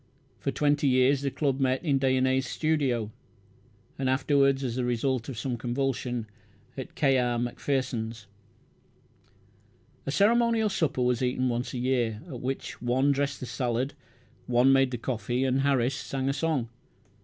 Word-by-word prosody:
For -, -, -2 dB
twenty 145 Hz, -1 st, +1 dB
years 130 Hz, +1 st, +4 dB
the 140 Hz, -, 0 dB
club 135 Hz, -1 st, -1 dB
met 130 Hz, +1 st, +1 dB
in 140 Hz, -3 st, +2 dB
Dyonnet's 130 Hz, 0 st, +2 dB
studio, 135 Hz, -10 st, 0 dB, 0.9 s
and 130 Hz, -1 st, 0 dB
afterwards, 135 Hz, 0 st, +2 dB
as 120 Hz, -3 st, -2 dB
the 125 Hz, -, -1 dB
result 125 Hz, +1 st, -1 dB
of 130 Hz, -, -6 dB
some 120 Hz, +1 st, -2 dB
convulsion, 125 Hz, -1 st, -2 dB, 0.5 s
in 130 Hz, -, -5 dB
K. 135 Hz, -3 st, +3 dB
R. 120 Hz, -1 st, 0 dB
Macpherson's. 120 Hz, -3 st, -2 dB, 1.8 s
A -, -, 0 dB
ceremonial 225 Hz, +5 st, +3 dB
supper 150 Hz, -9 st, 0 dB
was 125 Hz, 0 st, +1 dB
eaten 125 Hz, 0 st, +1 dB
once 120 Hz, +2 st, -3 dB
a -, -, -2 dB
year, 120 Hz, -3 st, 0 dB
at 130 Hz, -8 st, -7 dB
which 130 Hz, +1 st, -4 dB
one 130 Hz, +3 st, +2 dB
dressed 140 Hz, 0 st, -1 dB
the -, -, -3 dB
salad, 125 Hz, +2 st, -2 dB, 0.5 s
one 125 Hz, +2 st, +4 dB
made 135 Hz, -1 st, +4 dB
the 125 Hz, -, -3 dB
coffee, 120 Hz, +1 st, -2 dB
and 135 Hz, 0 st, +1 dB
Harris 135 Hz, -2 st, +2 dB
sang 135 Hz, 0 st, -3 dB
a 135 Hz, -, +1 dB
song. 140 Hz, -5 st, -1 dB
130 Hz, 155 wpm, -28 LUFS, 125-140 Hz, 1.8 s, years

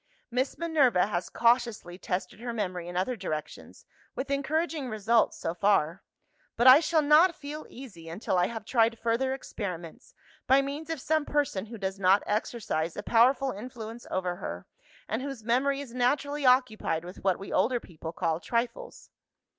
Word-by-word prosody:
Miss 255 Hz, +3 st, -1 dB
Minerva 285 Hz, -, +3 dB
has 180 Hz, -3 st, -3 dB
cautiously 235 Hz, -7 st, +1 dB
tested 180 Hz, +1 st, -4 dB
her 240 Hz, +1 st, -4 dB
memory 180 Hz, -6 st, -3 dB
in 175 Hz, 0 st, -5 dB
other 220 Hz, +8 st, 0 dB
directions, 155 Hz, -8 st, -6 dB, 0.3 s
with 275 Hz, +1 st, -4 dB
encouraging 295 Hz, 0 st, -1 dB
results, 220 Hz, +1 st, +2 dB
so 165 Hz, -, -3 dB
far. 185 Hz, -2 st, +1 dB, 0.6 s
But 240 Hz, -, +2 dB
I 260 Hz, +2 st, +10 dB
shall 315 Hz, -1 st, +2 dB
not 310 Hz, +4 st, +5 dB
feel 300 Hz, +1 st, -8 dB
easy 195 Hz, -11 st, -11 dB
until 180 Hz, +3 st, -2 dB
I 180 Hz, 0 st, +3 dB
have 225 Hz, -1 st, -7 dB
tried 230 Hz, -1 st, +2 dB
further 235 Hz, +4 st, 0 dB
experiments, 180 Hz, -10 st, -7 dB, 0.3 s
by 270 Hz, +1 st, +5 dB
means 290 Hz, +3 st, -5 dB
of 325 Hz, -3 st, -2 dB
some 310 Hz, +3 st, +1 dB
person 285 Hz, -9 st, -1 dB
who 230 Hz, +1 st, -8 dB
does 190 Hz, -1 st, -4 dB
not 195 Hz, +1 st, +4 dB
exercise 210 Hz, -6 st, -2 dB
a 205 Hz, -, -4 dB
powerful 260 Hz, +5 st, +3 dB
influence 230 Hz, +1 st, -8 dB
over 180 Hz, -1 st, -2 dB
her, -, -, -6 dB, 0.4 s
and -, -, -2 dB
whose 270 Hz, -4 st, -6 dB
memory 270 Hz, +5 st, +1 dB
is 255 Hz, -4 st, -9 dB
naturally 280 Hz, +3 st, +1 dB
occupied 220 Hz, -10 st, +2 dB
with 180 Hz, -, -10 dB
what 190 Hz, -2 st, +2 dB
we 195 Hz, -, -8 dB
older 245 Hz, +2 st, +2 dB
people 160 Hz, -5 st, -9 dB
call 165 Hz, -1 st, -1 dB
trifles. 235 Hz, +4 st, -3 dB
235 Hz, 165 wpm, -28 LUFS, 190-270 Hz, 0.6 s, I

